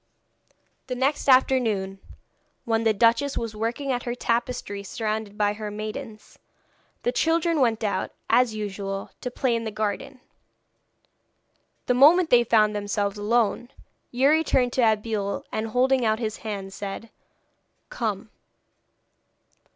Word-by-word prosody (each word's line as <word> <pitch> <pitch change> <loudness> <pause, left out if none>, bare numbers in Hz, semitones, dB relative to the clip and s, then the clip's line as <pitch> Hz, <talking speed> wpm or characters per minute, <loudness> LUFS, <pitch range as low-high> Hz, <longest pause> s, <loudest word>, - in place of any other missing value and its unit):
The 250 - -3
next 275 +3 0
afternoon, 225 -7 +3 0.7
when 225 0 0
the 220 - +5
duchess 230 +6 +2
was 225 -2 -4
working 235 +6 -2
at 245 -1 -1
her 240 0 -4
tapestry 235 -4 -2
surrounded 215 0 -4
by 205 -1 +2
her 210 0 -6
maidens, 215 +2 -7 0.6
the - - +1
children 330 - +1
went 230 -3 +1
out, 205 -2 -1 0.2
as 235 -1 +3
usual, 195 -2 -5
to 250 - -3
play 245 -1 0
in 230 - -2
the 220 - -3
garden. 215 +5 -4 1.7
The 250 - +2
moment 315 +7 +6
they 240 -1 +6
found 215 -2 +3
themselves 205 0 -2
alone, 230 +2 +1 0.4
Youri 280 +6 +3
turned 250 -5 +1
to 235 -4 +4
Abeille, 210 -2 -3
and 220 +1 -2
holding 255 +2 +2
out 220 -1 +2
his 220 -2 -3
hand, 200 -3 -6
said: 205 +3 -7 0.8
'Come.' - - -3
225 Hz, 130 wpm, -25 LUFS, 210-255 Hz, 1.7 s, moment